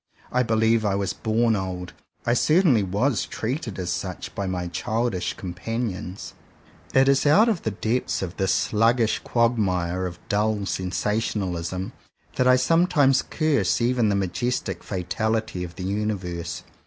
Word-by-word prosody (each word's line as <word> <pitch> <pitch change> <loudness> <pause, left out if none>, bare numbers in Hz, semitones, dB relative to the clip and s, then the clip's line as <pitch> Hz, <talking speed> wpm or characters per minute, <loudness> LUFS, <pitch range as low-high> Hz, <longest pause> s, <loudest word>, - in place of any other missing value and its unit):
I 125 - +2
believe 110 -1 +2
I 100 -2 +1
was 100 -1 -1
born 115 0 +1
old. 90 -2 -4 0.3
I 120 - +3
certainly 155 - +4
was 105 +6 0
treated 115 - -4
as 90 -2 -2
such 90 +1 -4
by 100 - -3
my 90 -1 -2
childish 110 +3 -1
companions. 95 +1 -5 0.6
It 135 0 +5
is 140 +1 +3
out 205 +10 +6
of 215 -7 +1
the - - -1
depths 110 +2 -1
of 90 -1 -6
this 95 -1 +1
sluggish 115 +1 +2
quagmire 95 -7 0
of 85 - -8
dull 105 0 0
sensationalism 95 -2 -2 0.4
that 125 - +2
I 125 - +7
sometimes 145 -1 +3
curse 155 -3 +1
even 120 -2 +2
the 100 - +2
majestic 95 0 -2
fatality 100 +1 -2
of 85 -1 -8
the 95 - -6
Universe. 95 -4 -3
105 Hz, 140 wpm, -24 LUFS, 95-120 Hz, 0.6 s, I